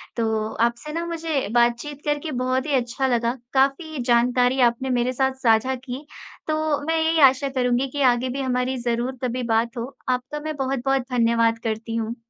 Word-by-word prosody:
तो 220 -2 -1 0.2
आपसे 235 +5 -3
ना 335 +1 -2
मुझे 330 -4 -2
बातचीत 240 +5 +1
करके 295 +1 -1
बहुत 255 +1 0
ही 305 - -3
अच्छा 255 +1 0
लगा, 240 0 0 0.2
काफ़ी 275 +3 +1
जानकारी 245 +1 +3
आपने 250 +3 -5
मेरे 245 +1 0
साथ 265 +1 +1
साझा 230 +3 +3
की, 260 +3 -8 0.4
तो 310 -2 0
मैं 325 - +1
यही 320 0 +2
आशा 275 +1 -3
करूँगी 250 0 +1
कि 285 - -3
आगे 245 +2 -2
भी 270 +2 -3
हमारी 255 0 -1
ज़रूर 240 +2 -2
तभी 250 0 -2
बात 230 +2 0
हो। 245 +4 -5
आपका 255 +4 -2
मैं 310 +1 -4
बहुत-बहुत 270 0 0
धन्यवाद 230 -1 +2
करती 225 0 -3
हूँ। 225 0 -2
255 Hz, 175 wpm, -23 LUFS, 235-275 Hz, 0.4 s, जानकारी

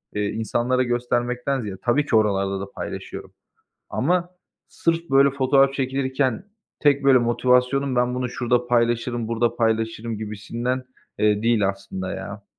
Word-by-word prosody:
eee, 105 0 0
insanlara 120 +4 0
göstermekten 125 +2 -1
ziyade 100 -4 -6
Tabii 140 +5 +2
ki 115 - 0
oralarda 100 -2 +1
da 100 0 -7
paylaşıyorum - - -7 0.6
ama 175 +5 0 0.4
sırf 165 -1 -1
böyle 135 +1 +5
fotoğraf 135 0 +3
çekilirken 130 0 -1 0.4
tek, 140 -1 +3
böyle, 135 -1 +6
motivasyonum, 125 +3 +2
"Ben 125 0 +1
bunu 125 -1 -2
şurada 120 0 0
paylaşırım, 120 -1 +1
burada 115 0 0
paylaşırım." 115 -1 -1
gibisinden, 115 +4 -3 0.4
eee, 105 0 +2
değil 115 -4 +3
aslında 95 -1 -5
ya. 100 +1 -7
120 Hz, 135 wpm, -23 LUFS, 110-130 Hz, 0.6 s, böyle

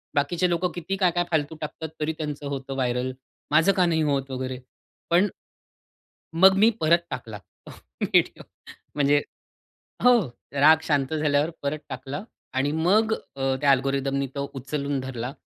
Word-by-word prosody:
बाकीचे 170 +5 +1
लोकं 175 +1 0
किती 175 +2 -3
काय-काय 175 -2 +2
फालतू 160 0 0
टाकतात, 155 +1 -5
तरी 155 +1 -1
त्यांचं 150 -2 -5
होतं 135 -1 -5
व्हायरल 125 -1 -1 0.4
माझं 160 +6 +5
का 180 - +4
नाही 165 -2 +1
होत" 140 -2 -1
वगैरे. 130 0 -4 0.5
पण 175 +4 +4 1.1
मग 190 +3 +7
मी 215 +3 +6
परत 170 +2 +3
टाकला 115 -6 -6
तो 95 - -17 0.3
व्हिडिओ - - +2 0.5
म्हणजे 145 0 +3 0.8
हो. 245 -1 +7 0.3
राग 150 +3 +6
शांत 145 -2 0
झाल्यावर 150 0 +1
परत 145 +2 -2
टाकला 135 +5 -6 0.3
आणि 135 +2 +1
मग 195 +8 +2 0.2
अ, 135 -1 0
त्या 140 - +5
अल्गोरिदमनी 135 +1 0
तो 140 0 -3
उचलून 140 +1 -3
धरला 130 -1 -5
145 Hz, 145 wpm, -25 LUFS, 135-165 Hz, 1.1 s, मग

